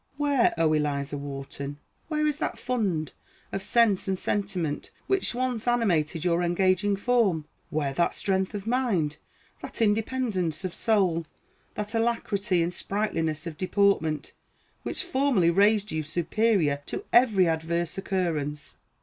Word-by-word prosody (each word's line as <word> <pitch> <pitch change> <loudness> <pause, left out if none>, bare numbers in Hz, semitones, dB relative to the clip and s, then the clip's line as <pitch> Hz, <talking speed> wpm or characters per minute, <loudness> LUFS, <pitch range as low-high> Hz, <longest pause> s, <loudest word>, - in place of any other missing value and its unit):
Where, 285 -4 +2
O 160 -1 +3
Eliza 145 -1 -1
Wharton, 140 0 -6 0.3
where 305 -1 0
is 300 -1 0
that - - -2
fund 200 - -1 0.4
of 195 - -3
sense 205 -1 +3
and 190 -1 0
sentiment 185 -7 -2 0.2
which 385 -10 +1
once 250 -2 -2
animated 175 -9 +1
your 175 0 +2
engaging 185 +3 +2
form? 200 -7 +1 0.2
Where 145 -3 -1
that 170 +5 +1
strength 190 +1 0
of 200 -1 -5
mind, 220 - 0 0.4
that - - -8
independence 210 - 0
of 180 - -3
soul, 185 -7 +1 0.5
that 210 +1 -4
alacrity 210 -6 +1
and 175 +1 -2
sprightliness 165 -8 -2
of 165 -3 -6
deportment, 185 -6 +1 0.5
which - - -3
formerly 265 - +2
raised 205 +3 +3
you 155 - -1
superior 170 -1 +1
to - - -5
every 220 -7 +5
adverse 165 +1 -1
occurrence? 165 -7 -2
190 Hz, 130 wpm, -27 LUFS, 160-225 Hz, 0.5 s, every